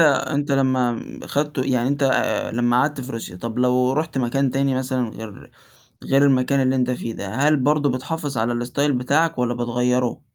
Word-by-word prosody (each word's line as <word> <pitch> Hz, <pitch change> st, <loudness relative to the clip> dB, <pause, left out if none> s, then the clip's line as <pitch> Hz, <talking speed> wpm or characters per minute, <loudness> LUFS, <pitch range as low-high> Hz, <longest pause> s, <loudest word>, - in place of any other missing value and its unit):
أنت 145 Hz, -2 st, +2 dB
لمّا 130 Hz, -3 st, +1 dB, 0.3 s
خدته 145 Hz, -2 st, -1 dB
يعني 125 Hz, -2 st, +1 dB
أنت 140 Hz, +1 st, -1 dB, 0.5 s
لمّا 120 Hz, +1 st, +2 dB
قعدت 145 Hz, +1 st, 0 dB
في 130 Hz, 0 st, -7 dB
روسيا، 115 Hz, -6 st, -6 dB
طَب 115 Hz, +5 st, -5 dB
لو 125 Hz, +1 st, +2 dB
رُحت 155 Hz, -1 st, -2 dB
مكان 130 Hz, +2 st, 0 dB
تاني 135 Hz, +1 st, 0 dB
مثلًا 130 Hz, -2 st, -1 dB
غير 110 Hz, -3 st, -10 dB, 0.5 s
غير 135 Hz, +1 st, +3 dB
المكان 135 Hz, 0 st, +2 dB
اللي 130 Hz, 0 st, +2 dB
أنت 125 Hz, -1 st, +1 dB
فيه 115 Hz, -2 st, -4 dB
ده، 100 Hz, -, -6 dB
هل 150 Hz, +2 st, +3 dB
برضه 145 Hz, +2 st, +2 dB
بتحافظ 140 Hz, +1 st, -4 dB
على 120 Hz, +1 st, -1 dB
الstyle 140 Hz, +4 st, 0 dB
بتاعك 140 Hz, +5 st, +1 dB
والَّا 120 Hz, -1 st, 0 dB
بتغيّره؟ 125 Hz, +1 st, -1 dB
130 Hz, 175 wpm, -22 LUFS, 120-140 Hz, 0.5 s, غير